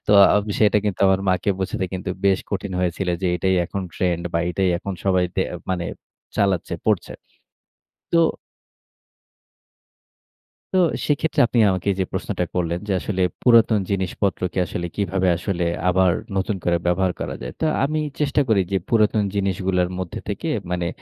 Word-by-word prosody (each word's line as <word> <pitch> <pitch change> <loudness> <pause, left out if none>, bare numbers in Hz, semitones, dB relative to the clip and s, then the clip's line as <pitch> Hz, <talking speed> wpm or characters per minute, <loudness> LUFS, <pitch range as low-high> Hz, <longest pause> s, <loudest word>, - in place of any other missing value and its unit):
তো 105 - +3 0.2
আম 105 - +2
সেটা 105 -1 +4
কিন্তু 100 -3 -2
আমার 95 0 +3
মা'কে 95 +2 +2
বোঝাতে 95 0 -2
কিন্তু 95 0 -4
বেশ 95 -1 +4
কঠিন 100 -1 -3
হয়েছিল 90 +1 -1
যে, - - +1
এটাই 95 +2 +1
এখন 100 - -4
ট্রেন্ড 85 -2 0
বা 85 - +1
এটাই 95 +1 +1
এখন 100 +1 -5
সবাই 95 -2 +3
তে 95 - +3 0.3
মানে 90 -2 -1 0.5
চালাচ্ছে, 95 -4 +1
পড়ছে। 105 -5 +1 1.0
তো 170 - +5 2.6
তো - - +4 0.3
সেক্ষেত্রে 150 +2 +1
আপনি 120 - -1
আমাকে 95 +1 -2
যে 95 - +2
প্রশ্নটা - - -2
করলেন, 85 -1 0
যে 100 - +1
আসলে 95 -3 -1 0.2
পুরাতন 115 -3 +5
জিনিসপত্রকে 95 -1 -1
আসলে 85 +3 -4
কিভাবে 95 -2 0
আসলে 90 -1 -2 0.2
আবার 90 -1 +4 0.2
নতুন 95 +1 0
করে 85 0 +2
ব্যবহার 90 +1 +2
করা - - -3
যায়? 60 - -5
তো - - +1 0.2
আমি 155 +2 0 0.2
চেষ্টা 145 0 +2
করি 105 -3 +4
যে, - - +3
পুরাতন 110 -2 +3
জিনিসগুলোর 95 -2 0
মধ্যে 90 -2 -5
থেকে, 105 +11 -3 0.2
মানে 90 -1 -1
95 Hz, 155 wpm, -22 LUFS, 90-100 Hz, 2.6 s, তো